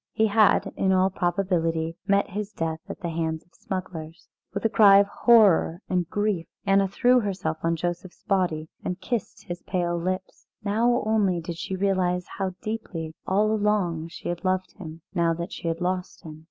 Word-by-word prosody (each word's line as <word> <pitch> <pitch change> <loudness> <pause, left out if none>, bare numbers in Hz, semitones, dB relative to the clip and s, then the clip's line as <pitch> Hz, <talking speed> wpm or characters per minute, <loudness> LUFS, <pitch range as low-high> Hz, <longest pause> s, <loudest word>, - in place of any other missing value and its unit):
He 220 - +3
had, 215 0 +3
in 190 - +1
all 190 0 +3
probability, 170 -3 0
met 200 0 +2
his 205 +1 -4
death 165 -4 -3
at - - -7
the 170 - -2
hand 160 -1 -2
of 175 - -36
smugglers. 175 -4 -6 0.2
With - - -4
a - - +7
cry 200 -2 +7
of 200 - +6
horror 200 -5 +4
and 180 -3 0
grief 205 -5 -1 0.2
Anna 195 0 +4
threw 250 +6 +3
herself 185 -7 -2
on 165 0 +1
Joseph's 175 +2 -5
body 175 -6 0 0.2
and 180 0 -3
kissed 235 -2 -4
his 175 0 -6
pale 175 -2 -1
lips. 185 +2 -4 0.2
Now 235 +4 +2
only 205 -5 +2
did 170 0 -6
she 190 - -4
realise 185 -2 +1
how 190 -2 -2
deeply 185 -8 -4
all 210 +3 +2
along 205 -7 0
she 170 - -9
had 175 +1 -3
loved 185 -1 0
him 165 -4 -9
now 170 -2 +2
that 170 +1 -5
she - - -5
had 165 +1 -2
lost 180 0 -3
him. 155 -1 -9
185 Hz, 180 wpm, -25 LUFS, 170-200 Hz, 0.2 s, a